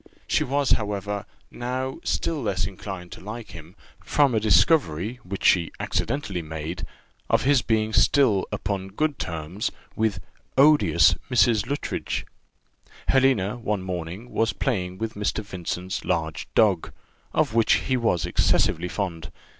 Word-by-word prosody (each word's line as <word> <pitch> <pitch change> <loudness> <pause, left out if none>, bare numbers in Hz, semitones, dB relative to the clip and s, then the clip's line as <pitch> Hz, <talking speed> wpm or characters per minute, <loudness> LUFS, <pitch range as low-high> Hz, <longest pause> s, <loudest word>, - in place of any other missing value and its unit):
She - - +2
was, 140 0 0
however, 100 -1 -1 0.2
now 130 +3 -3
still 160 -3 -1
less 95 -8 -1
inclined 95 -2 -7
to - - -10
like 110 +3 -7
him, 85 +1 -11 0.3
from 140 -4 +3
a 110 - +3
discovery, 105 - +3
which 95 +2 -5
she 85 -3 +4
accidentally 105 -11 -2
made, 80 +2 -5 0.4
of - - +3
his 140 -1 +4
being 110 -1 0
still 115 -9 +4
upon 95 -1 -3
good 145 +9 -1
terms 85 +6 -3 0.3
with 110 -4 0 0.4
odious 150 +2 +6 0.2
Mrs. 120 -4 +3
Luttridge. 145 - -3 0.8
Helena, 130 -6 +3
one 105 -5 -2
morning, 90 +5 -5
was 115 -1 +1
playing 95 -8 -2
with 110 +2 -3
Mr. 105 +1 -2
Vincent's 95 -1 -4
large 80 -2 -2
dog, 100 -6 +3 0.4
of 145 -7 +1
which 115 -1 +4
he 130 - +1
was 100 -9 +1
excessively 90 -1 +2
fond. 85 -4 -4
105 Hz, 135 wpm, -25 LUFS, 90-125 Hz, 0.8 s, odious